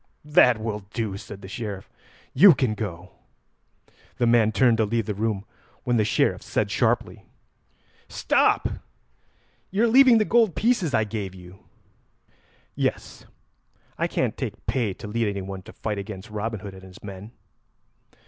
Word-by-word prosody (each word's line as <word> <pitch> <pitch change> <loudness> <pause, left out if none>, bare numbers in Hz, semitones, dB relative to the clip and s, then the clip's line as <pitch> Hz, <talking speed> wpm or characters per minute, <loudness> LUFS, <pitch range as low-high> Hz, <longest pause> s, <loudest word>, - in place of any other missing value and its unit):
"That 125 -6 +5
will 110 -1 -3 0.2
do," 110 -5 -2
said 100 0 -10
the - - -8
Sheriff. 100 -1 -6 0.5
"You 175 +4 +8
can 125 -4 0
go." 90 -4 -6 1.1
The 120 - +1
man 115 -2 +4
turned 115 +1 +3
to 110 - +2
leave 115 +1 -1
the 105 - -2
room, 105 -1 -2 0.4
when 120 -2 +1
the 110 - +3
Sheriff 105 - +1
said - - -2
sharply: - - 0 0.9
"Stop! - - +2 1.0
You 200 +4 0
are - - +5
leaving 255 0 +7
the 215 - +2
gold 225 -5 +3
pieces 215 - +1
I 110 - +3
gave 105 -3 -5
you." 90 +1 -13 1.1
"Yes, - - -3 0.7
I - - +1
can't - - -1
take - - -6
pay 110 -7 -1
to - - -9
lead 115 +1 -1
anyone 95 -1 -4
to - - -13
fight 105 -2 -4
against 100 +1 -8
Robin 105 0 -4
Hood 100 -1 -8
and 95 - -12
his 95 -1 -14
men." 100 +1 -9
110 Hz, 155 wpm, -24 LUFS, 100-120 Hz, 1.1 s, You